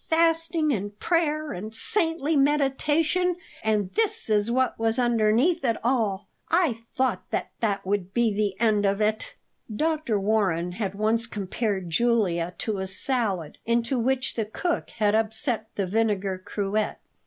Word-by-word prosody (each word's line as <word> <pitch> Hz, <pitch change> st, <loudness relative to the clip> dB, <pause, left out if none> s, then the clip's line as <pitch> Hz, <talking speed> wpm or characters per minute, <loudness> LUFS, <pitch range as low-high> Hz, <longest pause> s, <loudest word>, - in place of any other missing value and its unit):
Fasting 330 Hz, -1 st, +2 dB
and 205 Hz, -1 st, -4 dB
prayer 310 Hz, -1 st, 0 dB
and 215 Hz, +5 st, -4 dB
saintly 325 Hz, -, +1 dB
meditation; 295 Hz, +5 st, +2 dB, 0.3 s
and 210 Hz, -3 st, 0 dB
this 435 Hz, -, 0 dB
is 210 Hz, +1 st, +2 dB
what 255 Hz, 0 st, +1 dB
was 225 Hz, +1 st, +1 dB
underneath 240 Hz, +7 st, +2 dB
it 230 Hz, -3 st, +1 dB
all! 220 Hz, -5 st, 0 dB, 0.2 s
I 325 Hz, -10 st, +2 dB, 0.2 s
thought 260 Hz, 0 st, +1 dB
that 200 Hz, -4 st, -2 dB
would 195 Hz, -1 st, -1 dB
be 235 Hz, -1 st, +2 dB
the 200 Hz, -2 st, -1 dB
end 215 Hz, -3 st, +3 dB
of 200 Hz, 0 st, +1 dB
it." 220 Hz, -, -1 dB, 0.4 s
Dr. 305 Hz, -3 st, 0 dB
Warren 195 Hz, -5 st, +1 dB
had 195 Hz, 0 st, -3 dB
once 220 Hz, +3 st, +2 dB
compared 200 Hz, -3 st, -3 dB
Julia 180 Hz, -5 st, +1 dB
to 215 Hz, -3 st, -2 dB
a 190 Hz, -, -3 dB
salad 195 Hz, -, -1 dB
into 235 Hz, +2 st, 0 dB
which 260 Hz, +2 st, 0 dB
the 225 Hz, -, -2 dB
cook 335 Hz, +10 st, -2 dB
had 210 Hz, -2 st, +1 dB
upset 220 Hz, +1 st, 0 dB
the 200 Hz, -, 0 dB
vinegar 200 Hz, -2 st, 0 dB
cruet. 205 Hz, +2 st, -1 dB
225 Hz, 140 wpm, -25 LUFS, 205-275 Hz, 0.4 s, end